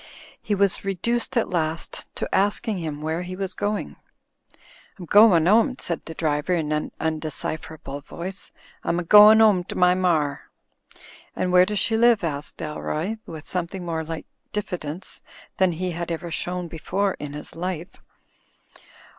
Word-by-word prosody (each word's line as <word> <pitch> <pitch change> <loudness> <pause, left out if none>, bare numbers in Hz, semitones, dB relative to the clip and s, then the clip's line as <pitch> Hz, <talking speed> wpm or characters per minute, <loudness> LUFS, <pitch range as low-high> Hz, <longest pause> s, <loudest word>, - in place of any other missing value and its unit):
He 210 - -1
was 200 -1 +2
reduced 235 +6 -1
at 230 - +1
last 160 -2 -2
to - - -3
asking 205 +1 +1
him 155 -3 -5
where 160 +2 -1
he 180 +1 -6
was 190 -1 -3
going. 205 +2 -3 1.0
"Fm 180 - -7
goin' 200 -6 +6
'ome/' 230 +6 +4
said 170 - -3
the 160 - -8
driver 150 +2 0
in 155 -3 -2
an 150 0 -1
imdecipher 160 0 -3
able 145 -2 -7
voice. 185 +6 -7 0.3
"I'm 170 - 0
a 175 - -1
goin' 210 +4 +8
'ome 200 -5 +4
to - - -6
my 180 0 +5
mar." 160 -6 0 0.9
"And 180 - -1
where 180 0 +6
does 210 - -2
she 225 +2 +2
live?" 235 -3 +4
asked 150 -3 -4
Dalroy, 155 +7 -3
with 160 -2 -8
something 180 0 -3
more 165 -2 -2
like 160 0 -6 0.3
diffidence 180 -4 -5 0.4
than 185 -2 +3
he 180 +2 -3
had 170 0 -4
ever 170 +1 -4
shown 180 +2 -3
before 190 +5 -1
in 145 -1 -6
his 150 - -8
life. 175 0 -5
175 Hz, 160 wpm, -24 LUFS, 160-195 Hz, 1.0 s, goin